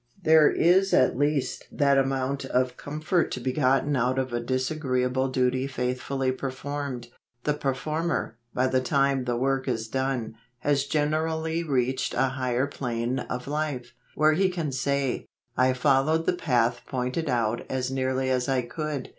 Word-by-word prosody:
There 155 -2 +6
is 190 +3 +3
at 130 - +4
least 145 0 -1
that 140 -1 +3
amount 135 0 -1
of 125 -1 0
com¬ 150 +2 -7
fort 175 +2 +2
to - - -3
be 130 +1 -2
gotten 135 +1 +2
out 125 +1 +1
of 130 -2 -1
a 120 - 0
disagreeable 130 0 0
duty 130 0 +1
faithfully 130 +1 -1
performed 135 -1 -5 0.2
— 120 0 -50
the 150 - +1
performer, 145 0 -2 0.2
by 125 - +1
the 130 0 +2
time 135 0 +1
the 120 -1 -1
work 135 +1 0
is 115 -3 -1
done, 130 -2 -2 0.3
has 140 -1 +1
generally 160 +2 0
reached 130 -4 0
a 135 - +2
higher 130 0 0
plane 125 -2 -2
of 125 0 -5
life, 145 -4 -3 0.2
where 155 +1 +4
he 190 +4 +2
can 165 -5 -3
say: 135 0 -1 0.3
I 130 0 +3
followed 140 +5 +2
the - - +2
path 120 -7 +1
pointed 130 +5 -2
out 120 -2 0
as 130 0 -2
nearly 130 0 0
as 125 +1 0
I 130 -2 +1
could. 150 +3 -4
135 Hz, 165 wpm, -26 LUFS, 125-145 Hz, 0.3 s, There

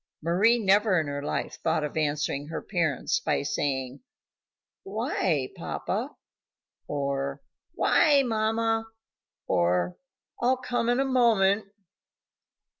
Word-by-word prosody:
Mari 195 +9 +4
never 200 -3 +3
in 160 - -1
her 145 0 -4
life 145 - -3
thought 155 - +1
of 150 - -4
answering 145 -2 -1
her 160 - -4
parents 165 -8 0
by - - 0
saying: 135 -2 -2 0.8
"Why, 190 - -1
papa?" - - -4 0.7
or 140 -1 -2 0.3
"Why, 285 -4 +4
mamma?" 225 -1 0 0.6
or 90 0 +1 0.4
"I'll 255 +2 +3
come 245 -2 -1
in 245 +1 +2
a 270 - +2
moment." 220 -6 +3
185 Hz, 110 wpm, -27 LUFS, 145-225 Hz, 0.8 s, Mari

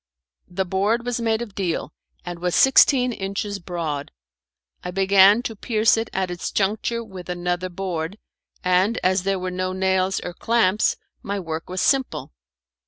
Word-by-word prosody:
The 190 +2 -2
board 205 +6 0
was 245 -1 -2
made 225 0 0
of 215 -4 -10
deal, 175 -5 -2 0.3
and 175 -1 -6
was 180 0 -1
sixteen 265 -2 +5
inches 200 0 -4
broad. 165 -5 -4 0.7
I 180 - -4
began 195 +4 +5
to 225 - -4
pierce 220 +1 +2
it 225 0 -2
at 190 -1 -2
its 175 - -4
juncture 220 +4 0
with 190 -5 -10
another 180 +1 -2
board, 180 0 -4 0.5
and 185 +5 +2
as 185 +1 +2
there 195 +1 0
were 185 0 -4
no 185 0 -2
nails 190 0 +1
or 175 - -6
clamps 215 -1 +2 0.3
my 200 0 -3
work 165 -2 -5
was 185 0 -2
simple. 270 -2 0
190 Hz, 160 wpm, -23 LUFS, 180-215 Hz, 0.7 s, sixteen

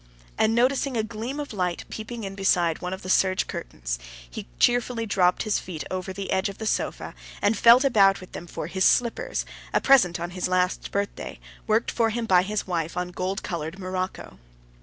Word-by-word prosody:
And 220 +1 +2
noticing 260 +1 +2
a 220 - +1
gleam 230 +6 -5
of 290 -5 -5
light 180 -3 -2
peeping 225 +1 -6
in 195 -1 -5
beside 180 -4 +1
one 180 - -3
of 190 - -6
the - - -7
serge 185 -1 +3
curtains, - - -5 0.3
he - - -8
cheerfully 240 -1 +2
dropped 185 -4 +2
his 215 -2 +1
feet 165 -6 -6
over 185 0 -3
the 195 +1 -5
edge 190 +2 +1
of 195 - -9
the 220 - -5
sofa, - - -2 0.3
and 205 +2 +2
felt 235 +4 +7
about 200 -7 +5
with 185 - -12
them 175 - -8
for - - -5
his 190 +3 -1
slippers, 250 - +2 0.3
a - - +6
present 190 -11 +4
on 175 +1 -4
his 180 0 -2
last 185 0 0
birthday, 200 0 -3 0.3
worked 220 +2 +2
for 230 -2 +2
him 230 +1 -2
by 185 -4 +5
his 210 +3 -2
wife 170 -2 -2
on 180 0 -1
gold 185 +3 -3
colored 165 0 -4
morocco. 185 - -5
195 Hz, 200 wpm, -25 LUFS, 180-225 Hz, 0.3 s, felt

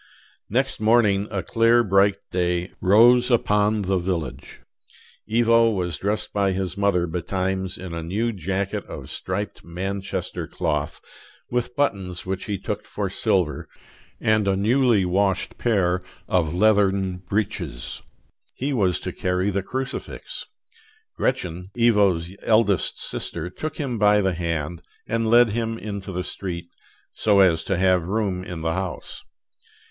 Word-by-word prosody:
Next 130 +5 0
morning 105 -3 +3
a 95 -4 -3
clear, 115 +4 +4
bright 100 -1 +3
day 90 0 0
rose 120 +6 +6
upon 105 -3 +2
the 95 0 +1
village. 85 -3 -4 0.7
Ivo 115 0 +4
was 90 -7 -2
dressed 105 +2 -2
by 100 -2 +2
his 95 -1 -3
mother 100 -3 +2
betimes 95 +2 -2
in 90 -2 -7
a 85 - -3
new 105 +8 -1
jacket 100 +1 -2
of - - -8
striped 100 +3 -4
Manchester 95 +1 -4
cloth, 75 +2 -2 0.5
with 125 0 -1
buttons 95 -10 -1
which 95 0 -3
he 100 -2 -2
took 95 - -4
for - - -4
silver, 90 -6 0 0.5
and 110 -2 +2
a 95 - +3
newly 115 0 +3
washed 95 +1 0
pair 95 -6 +1 0.3
of 85 -4 +1
leathern 95 -1 +2
breeches. 90 - -3 0.5
He 140 +2 -2
was 95 - +1
to - - -4
carry 90 +2 0
the 100 0 0
crucifix. 130 +7 -5 0.7
Gretchen, 90 -8 -2
Ivo's 100 -8 +3
eldest 110 -3 +2
sister, 85 +1 -3
took 155 +10 -5
him 125 -6 -2
by 105 0 +5
the 95 -1 +1
hand 85 -1 -3 0.3
and 115 -1 0
led 120 -1 +6
him 115 0 -2
into 100 -3 -6
the 90 0 -3
street, 85 -3 -5 0.4
"so 105 -2 +3
as 85 -4 +4
to 95 - 0
have 90 -2 +2
room 100 -3 -1
in 90 -3 -6
the 80 0 0
house." 95 0 -5
95 Hz, 140 wpm, -23 LUFS, 90-110 Hz, 0.7 s, rose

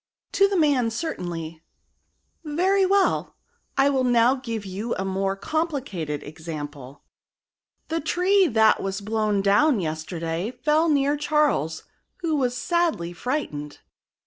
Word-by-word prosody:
" - - -70
To 395 - +4
the 395 -1 -1
man, 280 -7 +3
certainly," 175 - -5 0.8
Very 370 +5 +2
well; 395 0 +1 0.4
I 275 +1 +4
will 265 -2 +1
now 245 0 +4
give 230 -6 -5
you 200 +5 -3
a 190 - -3
more 195 0 -1
complicated 210 - -3
example. 145 -3 -8 0.9
The 325 0 -1
tree 365 +4 +3
that 220 -4 +4
was 195 0 -3
blown 210 -1 0
down 210 +6 +4
yesterday 165 +3 -3
fell 310 +2 +3
near 285 0 +2
Charles, 295 - +1 0.4
who 325 -3 0
was 250 -3 0
sadly 330 - 0
frightened." 170 - -4
230 Hz, 125 wpm, -24 LUFS, -, 0.9 s, To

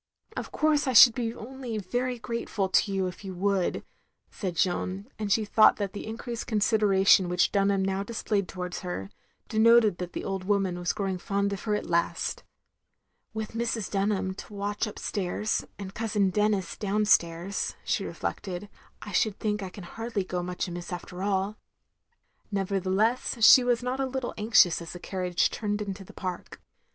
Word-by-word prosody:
"Of - - -5
course 305 -2 +2
I 260 - +1
should 240 0 +10
be 230 -1 -2
only 245 -1 -6
very 245 +5 -2
grateful 225 -3 -3
to 200 - +3
you 195 -1 0
if 180 +1 -6
you 190 -2 -6
would, 195 0 0 0.2
" - - -46
said 185 -4 -4
Jeanne; 185 +3 -1
and 210 -2 -2
she 215 +1 +3
thought 215 +1 +6
that 200 -2 -3
the 210 - -6
increased 230 +1 -5
consideration 200 -4 +4
which 180 0 +2
Dunham 195 -1 +2
now 195 0 -1
displayed 205 -2 -2
towards 180 -1 -5
her, 175 - -5 0.4
denoted 225 -3 +5
that 180 -1 -5
the - - -4
old 195 -1 -3
woman 190 -2 0
was 175 0 0
growing 195 -3 -2
fond 200 +2 -1
of 195 - -5
her 210 -1 +1
at - - -3
last. 170 0 -1 0.4
" - - -50
With 220 -1 -4
Mrs. 230 -2 -2
Dtmham 200 +1 +1
on 190 - -5
the - - -7
watch 205 +1 -2
upstairs, 210 0 -2
and 195 -1 -7
Cousin 210 -3 0
Denis 210 -2 0
downstairs, 195 -3 +1
" - - -31
she - - 0
reflected, 190 +1 -5 0.2
" - - -31
I - - -7
should 215 -4 +1
think 210 -1 -1
I 190 - -4
can 190 +1 -10
hardly 225 +3 -4
go 180 -1 -3
much 180 +1 -3
amiss 175 0 -6
after 180 +1 -6
all. 200 +1 0 0.4
" 470 - -44
Nevertheless 200 +4 +1
she 255 +1 +9
was 245 -1 +1
not 250 +2 -2
a 270 - 0
little 260 -1 -3
anxious 210 -5 +4
as 170 - -7
the 175 - -8
carriage 180 -1 0
turned 205 -2 -2
into 200 -2 -5
the - - -14
park. 185 -1 -6
200 Hz, 185 wpm, -27 LUFS, 185-220 Hz, 0.4 s, should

